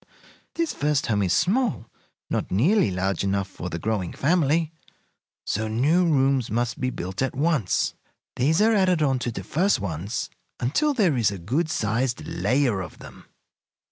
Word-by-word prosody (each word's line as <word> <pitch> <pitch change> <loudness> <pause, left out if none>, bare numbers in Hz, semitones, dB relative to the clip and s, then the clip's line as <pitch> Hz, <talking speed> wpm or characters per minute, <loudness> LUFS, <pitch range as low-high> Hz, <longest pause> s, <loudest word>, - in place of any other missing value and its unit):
This 335 -2 -1
first 145 -1 0
home 105 -3 +1
is 95 -3 0
small, 200 - +1 0.4
not - - -2
nearly 140 - +3
large 95 0 -1
enough 100 0 0
for 90 -2 -7
the 85 - -4
growing 100 -1 -2
family, 160 +1 +1 0.7
so 110 +2 -1
new 140 +11 +2
rooms 135 -5 +2
must 120 +2 -1
be 130 - +1
built 95 -4 -5
at 135 - -1
once. 145 - +1 0.4
These 155 +10 +2
are 225 +1 +4
added 185 -6 +3
on 135 -3 +1
to 120 - -2
the - - -6
first 185 - +1
ones 100 +5 -4 0.3
until 280 - +1
there 190 - +3
is 115 -4 +3
a 100 - -5
good 135 - -1
sized 120 +1 -1
layer 125 -7 +1
of 90 - -8
them. - - -13
130 Hz, 165 wpm, -24 LUFS, 100-160 Hz, 0.7 s, are